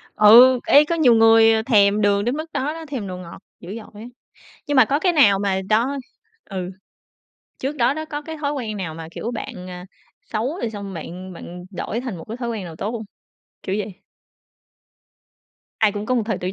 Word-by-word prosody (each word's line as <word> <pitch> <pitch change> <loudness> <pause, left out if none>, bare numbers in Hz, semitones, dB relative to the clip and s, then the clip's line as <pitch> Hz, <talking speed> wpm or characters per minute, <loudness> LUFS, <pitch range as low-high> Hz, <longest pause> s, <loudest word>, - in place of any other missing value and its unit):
Ừ, 245 +4 +8
ê, 290 +1 +7
có 335 - -1
nhiều 285 -8 +5
người 225 0 +5
thèm 210 -3 +3
đường 205 0 +2
đến 245 +3 0
mức 315 +1 -7
đó 290 +4 -1
đó, 325 0 -8
thèm 260 -8 -5
đồ 185 -1 -6
ngọt 175 -2 -10 0.2
dữ 180 +4 -8
dội 215 -2 -11
á. - - -9 0.6
Nhưng 290 - 0
mà 255 - +8
có 275 +6 0
cái 360 +2 +2
nào 215 - +5
mà 195 -1 0
đó 235 +6 +2 0.5
ừ, 185 -2 -4 0.9
trước 280 +3 -3
đó 250 +2 +2
đó 315 +1 -4
có 295 -1 -6
cái 320 +1 -7
thói 290 -1 -2
quen 225 -7 -4
nào 165 -5 -5
mà, 160 0 -8
kiểu, 230 - -5
bạn, 185 -6 -7
à, 180 +1 -9 0.4
xấu 245 - -3
rồi 235 - -2
xong 200 -3 -7
bạn 180 +3 -8
bạn 180 +1 -10
đổi 210 +4 -4
thành 250 -6 -5
một - - -9
cái 225 +2 -7
thói 240 -2 -4
quen 220 -5 -4
nào 165 -2 -9
tốt 210 - -3
hông? 230 -2 -5 0.6
Kiểu 190 - -2
vậy. 205 -2 -5 1.9
Ai 215 -2 +3
cũng 205 0 -5
có 255 - +1
một 240 - +1
thời 220 -4 -1
tuổi 180 +1 -3
220 Hz, 215 wpm, -21 LUFS, 195-260 Hz, 1.9 s, Ừ